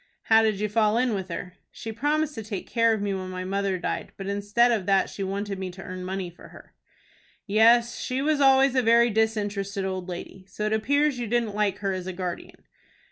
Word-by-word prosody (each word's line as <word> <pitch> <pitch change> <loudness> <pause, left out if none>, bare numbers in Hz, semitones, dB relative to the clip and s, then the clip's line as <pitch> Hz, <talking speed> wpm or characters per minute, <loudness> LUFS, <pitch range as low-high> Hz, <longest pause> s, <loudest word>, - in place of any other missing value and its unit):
"How 225 0 +5
did 215 -3 +1
you 210 - 0
fall 215 +1 +2
in 245 -1 +1
with 190 -2 -4
her?" 175 +1 -6 0.2
"She 225 - -7
promised 295 +6 0
to 225 - -6
take 205 -3 -6
care 230 -1 +3
of 215 -2 -1
me 200 -1 -1
when 185 -1 -4
my 185 0 -5
mother 195 0 -1
died, - - -4
but 195 - -6
instead 205 +4 +2
of 210 -6 -1
that 195 -1 +2
she - - -7
wanted 195 0 -3
me 190 -1 -4
to 185 +2 -10
earn 185 0 -7
money 185 -1 -4
for 175 - -15
her." - - -16 0.7
"Yes, 230 +3 +4
she 255 +1 -2
was 295 +1 +1
always 270 -1 +5
a 260 - +3
very 235 0 +4
disinterested 205 -2 -1
old 185 -1 -4
lady. 180 +1 -7
So 210 +3 -4
it 215 - 0
appears 285 +5 +1
you 240 - -3
didn't 230 -2 0
like 205 -2 0
her 195 - +1
as 185 -1 -5
a 185 - -4
guardian?" 180 -1 -6
210 Hz, 225 wpm, -26 LUFS, 190-235 Hz, 0.7 s, How